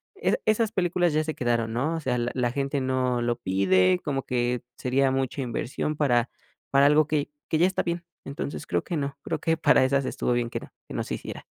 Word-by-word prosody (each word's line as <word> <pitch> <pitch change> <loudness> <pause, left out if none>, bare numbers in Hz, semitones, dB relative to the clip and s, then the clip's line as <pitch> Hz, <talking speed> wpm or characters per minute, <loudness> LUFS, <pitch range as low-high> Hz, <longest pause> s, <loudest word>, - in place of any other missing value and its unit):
esas 395 - 0
esas 215 0 +2
películas 175 -4 +1
ya 155 +1 +2
se 155 - -3
quedaron, 120 -2 0
¿no? 145 +8 0
O - - -2
sea, 130 -5 -1
la 120 0 -1
la 125 -2 0
gente 140 +2 -1
no 130 -2 0
lo 120 0 +1
pide, 95 -4 +3
como 135 -3 -2
que 125 0 0 0.2
sería 130 +1 +2
mucha 135 +1 -1
inversión, 130 +4 -2
para 120 -5 +2 0.4
para 140 +1 +5
algo 150 +2 +5
que 150 -1 -1 0.2
que 160 - +2
ya 175 +3 +5
está 190 - -1
bien, 170 0 -3 0.2
entonces 140 +1 -5
creo - - 0
que 175 - -4
no, 140 -2 -3
creo - - -2
que 165 0 +1
para 160 - +5
esas 135 +1 +2
estuvo 125 - -1
bien 120 -1 +1
que - - -4
no - - -12 0.2
que - - -9
no - - -1
se - - -4
hiciera. - - -8
135 Hz, 230 wpm, -26 LUFS, 120-155 Hz, 0.4 s, para